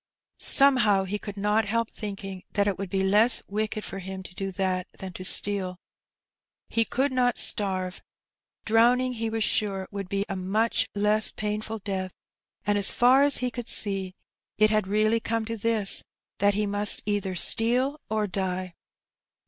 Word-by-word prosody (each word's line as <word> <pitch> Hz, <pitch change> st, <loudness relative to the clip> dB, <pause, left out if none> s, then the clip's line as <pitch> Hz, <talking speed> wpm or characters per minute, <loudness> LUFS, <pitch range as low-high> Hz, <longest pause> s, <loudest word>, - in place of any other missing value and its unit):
Somehow 245 Hz, -8 st, +5 dB
he 200 Hz, +2 st, -4 dB
could 205 Hz, -1 st, -8 dB
not 210 Hz, +2 st, +1 dB
help 230 Hz, +2 st, -1 dB
thinking 195 Hz, -3 st, -7 dB
that 200 Hz, -1 st, +1 dB
it 200 Hz, -, 0 dB
would 195 Hz, -2 st, -5 dB
be 190 Hz, +1 st, -1 dB
less 210 Hz, +5 st, +4 dB
wicked 215 Hz, +1 st, -3 dB
for 195 Hz, -, -6 dB
him 190 Hz, 0 st, -7 dB
to 185 Hz, -, -12 dB
do 195 Hz, +1 st, -5 dB
that 185 Hz, -1 st, -2 dB
than 190 Hz, -1 st, -8 dB
to 185 Hz, -, -8 dB
steal. 185 Hz, -1 st, +1 dB, 0.9 s
He 230 Hz, 0 st, +1 dB
could 270 Hz, +5 st, 0 dB
not 250 Hz, -2 st, +1 dB
starve; 185 Hz, -2 st, 0 dB, 0.6 s
drowning 245 Hz, +3 st, +3 dB
he 225 Hz, -1 st, -3 dB
was 225 Hz, 0 st, -1 dB
sure 195 Hz, -3 st, -1 dB
would 200 Hz, -2 st, -6 dB
be 200 Hz, +1 st, -1 dB
a 195 Hz, -, -4 dB
much 205 Hz, +5 st, 0 dB
less 210 Hz, +1 st, +3 dB
painful 215 Hz, +1 st, -4 dB
death; 190 Hz, -3 st, -5 dB, 0.5 s
and, 205 Hz, 0 st, +1 dB
as 200 Hz, -, +5 dB
far 255 Hz, +3 st, +4 dB
as 285 Hz, -1 st, +5 dB
he 250 Hz, -, -1 dB
could 240 Hz, -1 st, -7 dB
see, 195 Hz, -3 st, +1 dB, 0.4 s
it 215 Hz, 0 st, +4 dB
had 215 Hz, -3 st, +1 dB
really 215 Hz, +3 st, +1 dB
come 225 Hz, 0 st, -2 dB
to 230 Hz, +1 st, -4 dB
this, 220 Hz, -2 st, 0 dB, 0.4 s
that 200 Hz, 0 st, +2 dB
he 210 Hz, +1 st, 0 dB
must 205 Hz, 0 st, +2 dB
either 205 Hz, -3 st, -2 dB
steal 250 Hz, -, +1 dB
or 215 Hz, -1 st, 0 dB
die. 185 Hz, -2 st, -3 dB
205 Hz, 170 wpm, -26 LUFS, 195-225 Hz, 0.9 s, Somehow